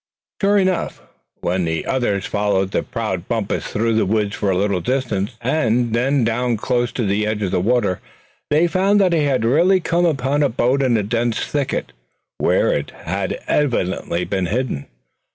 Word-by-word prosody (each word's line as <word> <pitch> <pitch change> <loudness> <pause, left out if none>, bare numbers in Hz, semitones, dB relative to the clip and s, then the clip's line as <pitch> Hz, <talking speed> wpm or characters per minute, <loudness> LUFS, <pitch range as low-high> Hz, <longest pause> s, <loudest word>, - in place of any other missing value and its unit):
Sure 200 +1 +4
enough, 185 -2 0 0.4
when 90 +1 0
the 80 -1 -2
others 105 -7 0
followed 100 -2 0
the - - +1
proud 100 -6 -4
Bumpus 115 -4 -2
through 115 +2 0
the 110 - +2
woods 105 0 0
for 100 - -1
a 95 - +1
little 100 -2 0
distance, 115 -1 -1
and 120 -3 +1
then 130 +3 +2
down 115 +1 0
close 120 +3 0
to 120 - -1
the 100 +2 0
edge 105 -1 -1
of 95 - -1
the - - +1
water, 105 -2 +1 0.5
they 155 +3 +4
found 195 +4 +2
that 185 -3 +3
he 155 -3 +2
had 130 -5 +1
really 170 +10 +4
come 175 0 +1
upon 140 -1 0
a 145 - +3
boat 125 +3 +1
in 125 -4 +3
a 105 - 0
dense 115 +2 -1
thicket, 140 - -2 0.5
where - - +2
it - - -2 0.2
had - - -2
evidently 95 -10 0
been 95 -2 -1
hidden. 110 - -2
115 Hz, 180 wpm, -20 LUFS, 100-140 Hz, 0.5 s, Sure